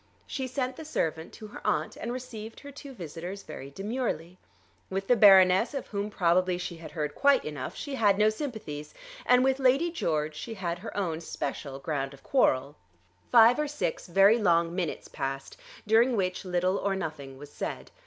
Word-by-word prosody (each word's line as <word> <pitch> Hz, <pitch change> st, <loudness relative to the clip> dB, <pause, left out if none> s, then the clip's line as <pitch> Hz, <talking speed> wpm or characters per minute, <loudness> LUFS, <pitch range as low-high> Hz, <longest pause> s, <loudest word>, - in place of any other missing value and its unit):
She 265 Hz, -2 st, -4 dB
sent 255 Hz, 0 st, -3 dB
the 320 Hz, -, -7 dB
servant 160 Hz, -, -2 dB
to 220 Hz, -, -10 dB
her -, -, -10 dB
aunt, 155 Hz, +1 st, 0 dB
and 235 Hz, -, -5 dB
received 230 Hz, -3 st, -7 dB
her 285 Hz, -, -10 dB
two 280 Hz, 0 st, -10 dB
visitors 180 Hz, -, -7 dB
very 140 Hz, -3 st, -8 dB
demurely. 195 Hz, -, -4 dB, 0.5 s
With 195 Hz, +1 st, -2 dB
the 245 Hz, -, +4 dB
Baroness, 195 Hz, +3 st, +6 dB
of 275 Hz, -, -3 dB
whom 205 Hz, 0 st, -3 dB
probably 180 Hz, -1 st, +2 dB
she 175 Hz, -1 st, -5 dB
had 165 Hz, -1 st, -9 dB
heard 150 Hz, -3 st, -2 dB
quite 280 Hz, -2 st, +3 dB
enough, 145 Hz, -4 st, -5 dB
she 285 Hz, -, -6 dB
had 205 Hz, -6 st, +3 dB
no 215 Hz, +1 st, +4 dB
sympathies; 215 Hz, -, -6 dB, 0.3 s
and 250 Hz, 0 st, +6 dB
with 265 Hz, 0 st, +2 dB
Lady 270 Hz, +6 st, +3 dB
George 155 Hz, -, -1 dB
she 225 Hz, +9 st, -6 dB
had 175 Hz, -3 st, -3 dB
her 210 Hz, -, -8 dB
own 170 Hz, -5 st, -1 dB
special 140 Hz, -3 st, -5 dB
ground 135 Hz, -1 st, -3 dB
of 135 Hz, -, -22 dB
quarrel. 140 Hz, -, +2 dB, 0.5 s
Five 235 Hz, +3 st, +7 dB
or 300 Hz, -, 0 dB
six 295 Hz, -7 st, -3 dB
very 195 Hz, +6 st, +5 dB
long 170 Hz, -4 st, +2 dB
minutes 175 Hz, -4 st, -3 dB
passed 135 Hz, 0 st, -5 dB, 0.3 s
during 230 Hz, +4 st, +4 dB
which 185 Hz, -2 st, -1 dB
little 180 Hz, +1 st, +1 dB
or 195 Hz, -1 st, 0 dB
nothing 155 Hz, -7 st, -6 dB
was 145 Hz, +1 st, -11 dB
said. -, -, -5 dB
190 Hz, 185 wpm, -28 LUFS, 160-240 Hz, 0.5 s, Five